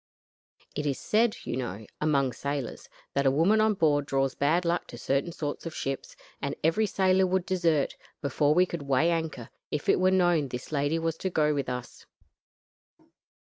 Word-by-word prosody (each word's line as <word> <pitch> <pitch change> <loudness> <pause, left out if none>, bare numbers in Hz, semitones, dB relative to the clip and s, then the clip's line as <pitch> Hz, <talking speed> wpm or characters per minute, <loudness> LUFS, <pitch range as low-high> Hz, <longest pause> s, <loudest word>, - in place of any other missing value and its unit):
It 150 0 -2
is 140 - 0
said, 220 +1 +2
you - - -3
know, 110 -4 -4 0.2
among 140 -4 +2
sailors, 140 -1 -4 0.2
that 140 -1 +2
a - - +7
woman 170 +11 +3
on 215 -1 +3
board 145 -5 +2
draws 135 -1 +1
bad 160 +5 +1
luck 170 +1 0
to 120 - -9
certain 135 +7 0
sorts 155 -1 -4
of 165 - -7
ships, 135 0 -4 0.3
and 140 - -2
every 190 +8 +3
sailor 190 -1 +3
would 185 -1 0
desert, 170 -6 +1 0.2
before 145 +1 +1
we 180 +1 +5
could 170 -3 -5
weigh 140 +5 +3
anchor, 160 -8 -3 0.2
if 150 - -3
it - - +4
were 185 0 +4
known 175 -5 +3
this 125 +2 -7
lady 145 +2 +1
was 165 0 -1
to 190 - -2
go 150 -3 +2
with 140 -3 -2
us. 125 -1 -6
150 Hz, 185 wpm, -28 LUFS, 140-175 Hz, 0.3 s, a